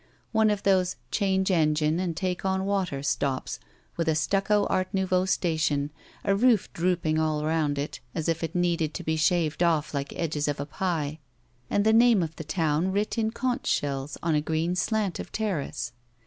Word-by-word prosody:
One 220 -1 +4
of 205 -1 -1
those 185 -2 +2 0.2
change 190 -2 +1
engine 155 -1 +2
and 175 -3 -2
take 185 -2 -2
on 190 0 0
water 190 -9 -1
stops 140 -2 -1 0.4
with 165 -1 -1
a 160 - +2
stucco 195 +5 +2
art 185 0 0
nouveau 185 -1 +1
station, 155 -6 0 0.3
a 200 -1 +2
roof 230 -1 +3
drooping 170 -3 +1
all 155 -1 0
rotmd 155 -2 0
it, 145 +2 -4 0.2
as 160 - -2
if 165 0 0
it 165 +2 -4
needed 170 -3 +1
to - - -4
be 160 - 0
shaved 160 0 +1
oE 165 -4 +3
like 140 -1 -3
edges 155 -3 -1
of 145 -1 -1
a 140 - -2
pie, 155 -2 -2 0.5
and 205 - +1
the 220 - +5
name 230 -4 +5
of 160 -1 -5
the - - -5
town 160 +3 0
writ 210 +4 -1
in 220 -1 +1
conch 245 +2 -2
shells 140 0 -1
on 165 -1 +1
a 150 - +2
green 160 +3 -1
slant 210 0 0
of - - -7
terrace. 200 -10 -2
170 Hz, 190 wpm, -27 LUFS, 155-190 Hz, 0.5 s, the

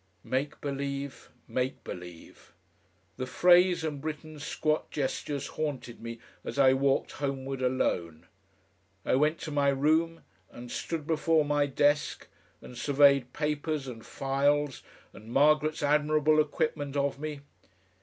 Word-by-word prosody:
"Make 140 +3 -2
believe. 140 -1 -4 0.2
Make 130 +1 -2
believe." 90 -2 -10 0.6
The 130 - -3
phrase 180 +3 +5
and 150 -3 -3
Britten's 155 0 -6
squat 155 +1 -1
gestures 140 0 -2
haunted 140 -6 -4
me 115 0 -6 0.3
as - - -6
I 135 -2 +6
walked 135 0 +1
homeward 135 -1 -3
alone. 85 -11 -1 0.8
I - - +1
went 150 +5 +3
to 155 - -5
my 145 -1 +2
room 160 +4 +1 0.3
and 120 0 -10
stood 165 -3 -3
before 160 -1 +2
my 145 0 +2
desk 145 +2 +1 0.4
and 125 - -10
surveyed 140 0 +4
papers 150 -1 -2
and 115 -3 -8
files 140 0 0 0.3
and 110 +2 -12
Margaret's 150 +3 +3
admirable 150 +1 +3
equipment 145 -1 -2
of 140 -1 0
me. 150 -1 -5
145 Hz, 125 wpm, -29 LUFS, 135-155 Hz, 0.8 s, I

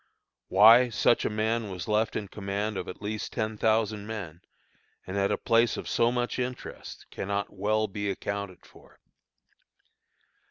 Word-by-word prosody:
Why 115 +6 +7
such 120 +1 +2
a - - +1
man 110 +1 -1
was 90 -4 -6
left 105 +1 +1
in 105 - -3
command 100 +2 -3
of - - -4
at 90 - -9
least 105 +1 -4
ten 110 -1 -2
thousand 110 -1 0
men, 90 -7 -6 0.6
and 95 - -6
at 100 0 +1
a - - +1
place 115 0 +2
of - - -6
so 115 0 +2
much 120 +1 -2
interest, 125 0 -6
cannot 100 +1 -3
well 105 +2 0
be 100 0 -3
accounted 100 -1 -5
for. - - -19
105 Hz, 155 wpm, -28 LUFS, 100-110 Hz, 0.6 s, Why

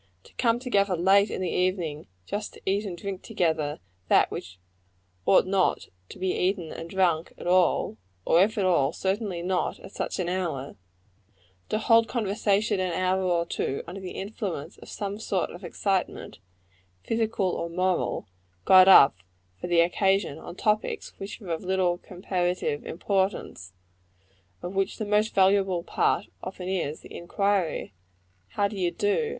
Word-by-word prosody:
To - - -19
come 230 -1 +2
together 200 -7 +1
late 195 +4 +4
in - - -4
the 185 - -1
evening, 180 -5 -1 0.2
just 205 - -4
to - - -15
eat 200 +2 0
and 180 -3 -5
drink 195 0 -5
together 160 -8 -1 0.3
that - - +4
which 90 0 -7 0.7
ought 190 - +6
not 190 -1 +1 0.2
to - - -10
be 190 0 -1
eaten 180 -3 -1
and 165 - -7
drunk 175 -4 +1
at - - -9
all 180 -10 +2 0.3
or 170 - +5
if 220 +3 -1
at 200 - +1
all, 150 -7 +3
certainly 190 -2 -2
not 180 0 -1
at - - -12
such - - -3
an 180 - -2
hour; 170 -7 -3 0.9
to - - +1
hold 230 0 +4
conversation 210 -2 0
an 185 -2 -1
hour 185 +2 +1
or 175 -2 +1
two 140 -4 -3
under 190 +3 -8
the 185 - -6
influence 190 -5 -5
of - - -12
some 200 0 -4
sort 195 -4 -1
of 175 - -11
excitement, 185 - -2 0.6
physical 220 -4 0
or 170 - -3
moral, 180 +1 -1 0.4
got 185 0 +8
up 145 - +8 0.4
for - - -5
the 175 -1 +4
occasion, 190 -1 +1
on 175 - -9
topics 210 +2 -1
which 195 +1 -7
are 185 - -8
of 165 - -2
little 180 -1 +1
comparative 180 -5 -2
importance 190 - -2 0.9
of 180 - -5
which 195 +1 -1
the 215 - -3
most 210 +1 +1
valuable 190 -2 +3
part - - +1 0.2
often 185 -1 -6
is, 170 -5 -2
the - - -12
inquiry, 190 - -1 0.5
How 200 - 0
do 205 - -8
you 180 -3 0
do? 415 - 0
185 Hz, 160 wpm, -26 LUFS, 175-200 Hz, 0.9 s, got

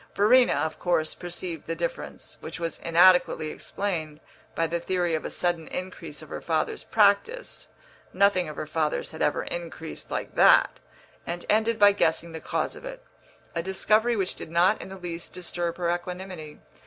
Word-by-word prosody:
Verena, 245 +5 +5
of 155 +2 -2
course, 165 -3 +1
perceived 175 -2 -6
the 165 - -2
difference, 170 +1 -5
which 160 - -7
was 165 -1 -3
inadequately 170 -2 +4
explained 160 -7 -4 0.4
by 165 - +1
the 170 +1 -1
theory 175 -1 0
of 160 - -1
a - - -2
sudden 175 -3 -1
increase 165 -4 -6
of 155 - -13
her - - -6
father's 160 -2 -1
practice 225 - +1 0.4
(nothing 185 -3 +3
of 150 - -7
her - - -4
father's 155 0 -1
had 160 - -8
ever - - +1
increased 165 -2 -6
like - - -4
that), - - +5 0.5
and 175 +1 -4
ended 220 +1 +2
by 205 0 +7
guessing 170 -3 0
the 160 - -6
cause - - -2
of - - -12
it - - -8 0.5
a 165 - -1
discovery 215 +6 +2
which 195 -4 0
did - - -8
not 175 +5 +3
in - - -8
the 190 - -8
least 170 -2 -7
disturb 175 -1 -3
her 175 -1 0
equanimity. 180 -3 -6
175 Hz, 175 wpm, -26 LUFS, 165-190 Hz, 0.5 s, by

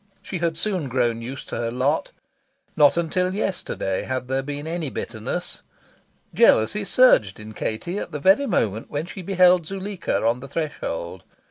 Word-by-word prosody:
She 180 - -4
had 165 -1 -1
soon 185 -5 -1
grown 120 -2 0
used 130 +4 -7
to - - -4
her 115 - -1
lot. 130 +6 0 0.6
Not 150 0 +5
until 180 +3 0
yesterday 185 - -2
had 130 -1 -3
there 135 0 +1
been 145 +2 -6
any 165 -2 -3
bitterness. 110 -3 -5 0.7
Jealousy 160 - +4
surged 185 - +4
in 110 0 -9
Katie 170 - -3
at - - -6
the 150 - -4
very 195 - +4
moment 110 - 0
when 145 +2 -3
she 185 +2 -8
beheld 180 -2 +4
Zuleika 195 - -2
on 115 +2 +2
the 135 - -9
threshold. 95 - -4
145 Hz, 160 wpm, -23 LUFS, 120-180 Hz, 0.7 s, Not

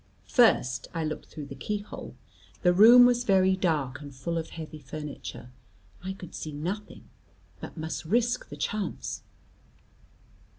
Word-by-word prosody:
First 130 - +3
I 165 - 0
looked 155 0 -4
through 150 - -8
the - - -8
key 210 - -3
hole; 205 +1 -9 0.5
the 180 -1 +5
room 235 +6 +9
was 245 0 +3
very 190 -3 +4
dark 150 -8 0
and 145 -1 -8
full 150 +6 -3
of 160 - -6
heavy 155 -2 -8
furniture; 145 -3 -7 0.5
I 190 +1 -3
could 180 -3 -11
see 155 - -6
nothing; 180 +8 -5 0.5
but - - -9
must 160 +1 -4
risk 240 +7 +1
the 145 - -8
chance. 205 +7 -3
170 Hz, 145 wpm, -28 LUFS, 150-210 Hz, 0.5 s, room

